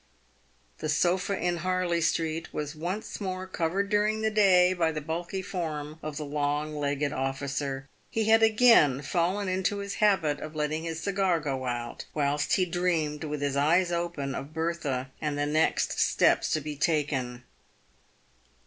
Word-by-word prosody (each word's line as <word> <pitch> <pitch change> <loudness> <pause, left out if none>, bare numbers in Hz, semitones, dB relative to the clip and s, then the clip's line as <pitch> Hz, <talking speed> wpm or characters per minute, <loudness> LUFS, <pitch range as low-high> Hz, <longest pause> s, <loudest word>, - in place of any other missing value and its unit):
The 155 - -3
sofa 180 +5 +1
in 175 -1 0
Harley 180 0 0
street 165 0 -1
was 150 0 -4
once 180 +8 -4
more 185 -1 -3
covered 190 +2 -1
during 210 +1 +1
the 220 - +2
day 185 -4 +5
by 165 -3 +1
the 155 - -3
bulky 170 +5 -4
form 155 -5 -4
of 150 -1 -5
the 150 - -4
long 145 +1 -1
legged 145 0 -1
officer. 135 +1 -3 0.2
He 225 - 0
had 220 +1 +5
again 220 - +5
# - - -13
fallen 180 +6 0
into 185 +2 0
his 200 0 -4
habit 165 -9 +3
of 155 0 -8
letting 155 +2 -2
his 165 -1 -4
cigar 195 -3 +1
go 135 -4 -3
out, 120 -1 -4
whilst 145 -1 0
he 185 - +3
dreamed, 170 -4 -1
with 150 -1 -4
his 140 -1 0
eyes 170 +6 +3
open, 170 -5 -2
of 145 +3 -7
Bertha, 150 -6 -2
and 150 -2 -2
the 145 - 0
next 155 +2 +1
steps - - +3
to 155 - 0
be 150 0 -5
taken. 140 -5 -1
160 Hz, 165 wpm, -28 LUFS, 145-185 Hz, 0.2 s, day